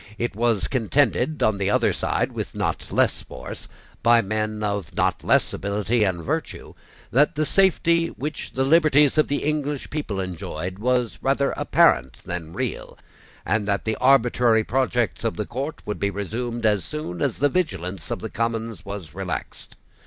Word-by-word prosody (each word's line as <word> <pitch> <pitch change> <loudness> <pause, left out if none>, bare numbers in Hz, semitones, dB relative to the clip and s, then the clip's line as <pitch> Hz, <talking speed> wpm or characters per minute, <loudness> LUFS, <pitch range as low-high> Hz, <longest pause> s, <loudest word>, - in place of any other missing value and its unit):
It 120 -2 -2
was 115 -3 +1
contended 135 +4 +1
on 110 -2 +2
the 100 0 +1
other - - +3
side - - -1
with - - -5
not - - -2
less - - +2
force, 65 - -9 0.3
by 120 0 +6
men 110 +1 -2
of 100 -4 -3
not - - 0
less - - +3
ability 105 +3 0
and 90 -4 -1
virtue, - - -4 0.4
that 145 +5 +3
the 155 +1 +1
safety 170 -2 +3
which 150 -1 -6
the 130 - +1
liberties 150 -1 +4
of 155 - +4
the 145 - -1
English 150 -2 -2
people 145 -10 -3
enjoyed 90 0 -5
was 125 0 0
rather 140 +1 +1
apparent 65 +1 +3
than 85 -2 -5
real, - - -4 0.5
and 105 -2 0
that 100 -1 0
the 110 -1 0
arbitrary 120 -3 +4
projects 125 -1 0
of 115 - -1
the 105 - -2
court 135 +6 -5
would 105 - -4
be 100 - +1
resumed 115 +4 -3
as 105 -3 +3
soon 90 - -5
as - - 0
the 145 - +3
vigilance 95 - -2
of - - -3
the - - -4
Commons 115 -3 -2
was 100 -7 -7
relaxed. 95 -1 -6
115 Hz, 165 wpm, -24 LUFS, 100-135 Hz, 0.5 s, by